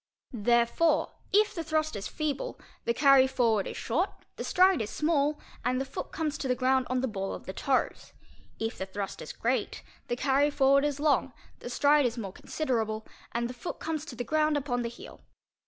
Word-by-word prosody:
Therefore, 240 +8 +2 0.2
if 425 +2 +4
the 335 -5 -4
thrust 310 -1 0
is 200 - -4
feeble, 310 - -3 0.3
the 235 - +2
carry 275 -1 +6
forward 230 -6 +1
is - - -6
short, 330 - 0 0.3
the - - -5
stride 370 -4 +4
is 210 - -3
small, 300 0 +1 0.2
and 255 +1 +1
the 270 - -1
foot 270 - -6
comes 315 -2 -2
to 270 - -2
the 250 - +2
ground 260 0 +2
on 255 0 +1
the 265 - 0
ball 195 -4 -3
of - - -10
the 190 - -5
toes; 265 +6 -1 0.5
if 225 +1 -3
the 190 - -3
thrust 195 +1 -5
is - - -6
great, - - -1 0.2
the 240 - -1
carry 275 +3 +3
forward 275 0 +4
is 290 -1 -1
long, 285 -3 +2 0.3
the - - -7
stride 285 +1 +4
is 235 0 -5
more 195 -5 -5
considerable, 220 -8 -2 0.3
and 235 0 -1
the 250 - -6
foot 250 +8 -6
comes 315 -2 -3
to 270 - -8
the 245 - -3
ground 305 +3 +2
upon 255 -4 -1
the 235 - -2
heel. 235 - -12
265 Hz, 205 wpm, -29 LUFS, 235-305 Hz, 0.5 s, carry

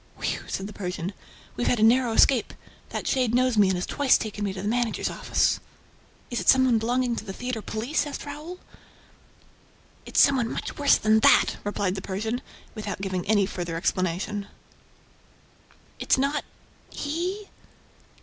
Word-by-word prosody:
"Whew!" - - -3
said 190 - -3
the 210 - -8
Persian. 180 -1 -4 0.4
"We've 240 - -1
had 245 - +2
a - - +3
narrow 240 +1 +4
escape; 245 +1 +3 0.3
that - - -4
shade 250 -3 +1
knows 255 -1 +2
me 205 -2 +5
and 190 -1 +1
has 180 - -2
twice 285 -3 +3
taken 210 -1 -5
me 200 - -1
to 190 0 -6
the - - -2
managers' 235 0 0
office." - - +1 0.7
"Is 240 - -1
it - - 0
some 260 0 +6
one 240 -3 +3
belonging 245 +1 0
to - - -4
the 195 -3 -7
theater 245 +1 -4
police?" 235 +9 -2
asked 290 - -6
Raoul. 300 +5 -7 1.5
"It's - - +1
some 280 -1 +6
one 235 -3 0
much - - -5
worse 285 - +5
than 215 0 +3
that!" - - +5
replied 205 -2 -1
the 190 - -5
Persian, 220 +6 -3 0.3
without 210 -4 -5
giving 185 -1 -3
any 205 -2 +3
further 175 -3 -4
explanation. 185 +4 -1 1.5
"It's - - +2
not... 280 +3 0 0.5
he?" 360 +8 -4
220 Hz, 170 wpm, -25 LUFS, 200-255 Hz, 1.5 s, some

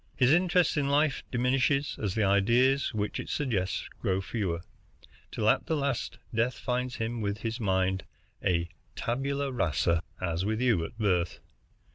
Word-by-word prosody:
His 125 0 +4
interest 175 -1 +3
in 140 -1 +1
life 145 0 +2
diminishes 135 +3 +1
as 100 -3 -1
the 110 - +2
ideas 120 +8 +3
which 105 -3 -2
it - - -6
suggests 110 -11 -1
grow 95 0 0
fewer, 95 -4 -2 0.7
till 105 - -1
at - - +3
the 160 - +1
last 140 -5 -1 0.2
death 115 +3 +1
finds 125 0 -2
him 115 0 -3
with 100 +1 -2
his 115 +1 -3
mind 95 -2 +1 0.4
a 85 -1 +1 0.3
tabula 140 +3 -1
rasa, 85 - +1 0.2
as 85 -1 -1
with 110 +2 -1
you 120 -9 +3
at 80 - -7
birth. 90 -6 +1
115 Hz, 155 wpm, -29 LUFS, 95-135 Hz, 0.7 s, His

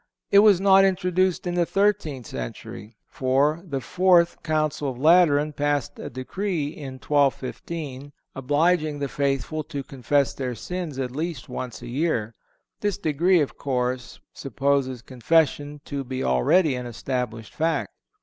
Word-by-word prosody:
It 200 - +8
was 205 -3 +6
not 195 0 +6
introduced 185 -1 +1
in 175 - -2
the 175 0 +2
thirteenth 170 - 0
century, 100 - -8
for 140 +5 +1
the 145 -7 -4
Fourth 180 0 +3
Council 155 -2 -1
of 125 - -6
Lateran 155 0 +4
passed 145 -2 -1
a - - -6
decree 150 - -3
in 145 -3 -8
1215 140 +1 -2 0.2
obliging 150 +3 +1
the 140 -1 -2
faithful 140 +3 -1
to 145 -4 -5
confess 140 +1 0
their 125 -2 -4
sins 175 -1 -5
at 130 -2 -2
least 155 0 -4
once 125 -1 -6
a - - -7
year. 120 -4 -1 0.5
This 205 -2 -1
decree, 170 0 +2
of 145 - -3
course, 125 -2 -2
supposes 135 -3 -1
Confession 145 +2 0
to 140 -1 -4
be 130 0 -4
already 135 - +3
an 125 -1 -4
established 120 -2 -4
fact. 165 +1 -1
145 Hz, 140 wpm, -24 LUFS, 130-170 Hz, 0.5 s, It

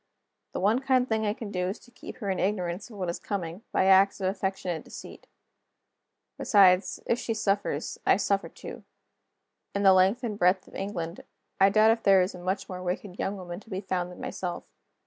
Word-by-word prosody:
The - - -3
one 210 +6 +3
kind 260 -2 +2
thing 220 -2 0
I 205 - 0
can 220 -4 -7
do 180 -1 -1
is 195 +4 -3
to 245 - -19
keep 245 - -10
her 205 -5 -2
in 190 - -2
ignorance 185 0 -2
of 215 - -11
what 185 -2 -3
is 170 - -3
coming, 180 -2 -4
by - - +2
acts 195 +1 +5
of 190 - 0
affectionate 190 -3 -2
deceit. - - -11 1.1
Besides, 190 -2 +4
if 235 - +1
she 225 - -2
suffers, 200 -8 -1
I - - +4
suffer 200 -1 0
too. - - -10 0.9
In 200 - 0
the 190 -1 +7
length 190 +7 +3
and 215 -3 -3
breadth 180 +1 +3
of - - -17
England, 185 -3 -4 0.4
I 195 0 +6
doubt 215 +2 +5
if 225 0 0
there 195 -3 +5
is 185 - -3
a 180 - -9
much 185 +3 -2
more 180 -1 -6
wicked 180 +1 -4
young 200 +1 -2
woman 175 -1 -7
to 220 - -19
be 190 - -3
found 180 -2 -3
than 180 - -12
myself. 175 -2 -4
195 Hz, 205 wpm, -27 LUFS, 180-210 Hz, 1.1 s, the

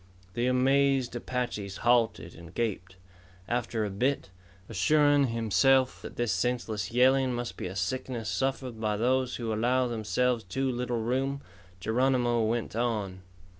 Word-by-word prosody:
The 120 +1 0
amazed 135 0 +2
Apaches 120 -6 -3
halted 115 -8 +2
and 85 +2 -13
gaped. 95 -5 -2 0.5
After 120 -2 -1
a 100 - -4
bit, 125 +1 -1 0.4
assuring 145 +7 +3
himself 125 +3 +2
that - - -9
this 120 -2 0
senseless 110 0 -1
yelling 130 +1 +3
must 120 0 -4
be - - -5
a 90 - -7
sickness 115 +4 -3
suffered 130 -2 -2
by 105 -1 0
those 130 +3 +1
who 115 -2 -3
allow 125 +4 +2
themselves 120 +1 0
too 130 +8 -1
little 120 -2 -2
room, 135 +4 -1 0.4
Geronimo 120 +2 +1
went 115 0 -1
on. 105 -6 -2
120 Hz, 135 wpm, -28 LUFS, 110-130 Hz, 0.5 s, assuring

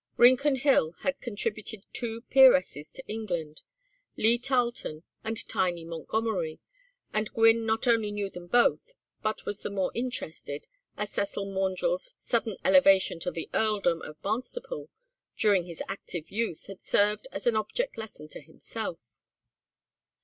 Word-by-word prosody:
Rincon 260 +4 +6
Hill 255 - +3
had 275 0 -1
contributed 215 -2 -4
two 230 -1 -2
peeresses 215 - +5
to 265 - -9
England, 175 -8 -4 0.6
Lee 230 +2 +4
Tarlton 240 - -1 0.2
and 225 0 -2
Tiny 175 -3 0
Montgomery, 170 0 -2 0.5
and 215 0 0
Gwynne 225 0 +5
not 220 0 +1
only 225 -3 +3
knew 205 -1 -2
them 175 -2 -10
both, 245 - +2 0.3
but 215 0 -2
was 205 0 -4
the - - -3
more 195 -2 -1
interested, 230 - -4 0.3
as 210 0 -3
Cecil 200 0 -2
Maundrell's 195 - -1
sudden 225 -4 -1
elevation 190 -1 +5
to 175 - -1
the 165 -2 -5
earldom 205 -6 +2
of 155 0 -9
Barnstaple 365 - -3 0.5
during 200 -5 +4
his 170 -2 -6
active 175 -4 -5
youth 220 -6 -2
had 195 -2 -10
served 210 +1 +2
as 195 - -6
an 240 -2 +3
object 350 - -1
lesson 210 -9 -8
to - - -7
himself. 160 - -7
210 Hz, 140 wpm, -28 LUFS, 180-230 Hz, 0.6 s, Rincon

